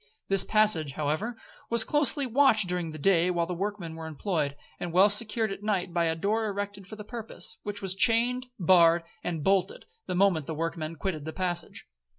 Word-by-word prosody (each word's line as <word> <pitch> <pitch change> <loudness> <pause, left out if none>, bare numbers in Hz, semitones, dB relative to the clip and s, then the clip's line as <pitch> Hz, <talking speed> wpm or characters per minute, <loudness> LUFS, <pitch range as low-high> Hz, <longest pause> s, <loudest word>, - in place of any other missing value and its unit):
This 195 -1 +5
passage, 210 -10 +2
however, 155 - -2 0.3
was 235 -1 +4
closely 290 0 +3
watched 240 -5 +3
during 180 -2 -2
the 155 - -8
day 175 +2 +3
while 170 -2 0
the 180 - -4
workmen 190 -2 -4
were 160 0 -7
employed, 155 -2 -2 0.2
and 175 - -4
well 190 +4 +5
secured 215 +1 +2
at 195 - -6
night 190 -4 -1
by 170 -1 +1
a 160 0 0
door 215 +6 -1
erected 200 -1 -5
for 215 - -9
the 210 - -9
purpose, 225 0 -5
which 205 -1 -6
was 190 -1 -2
chained, 245 +4 +1
barred, 170 -2 +5 0.2
and 165 -4 -3
bolted, 190 +1 0 0.2
the - - -2
moment 180 -6 +2
the 160 - -4
workmen 165 0 -4
quitted 155 -1 -4
the 160 - -5
passage. 175 -2 -4
190 Hz, 190 wpm, -28 LUFS, 165-215 Hz, 0.3 s, This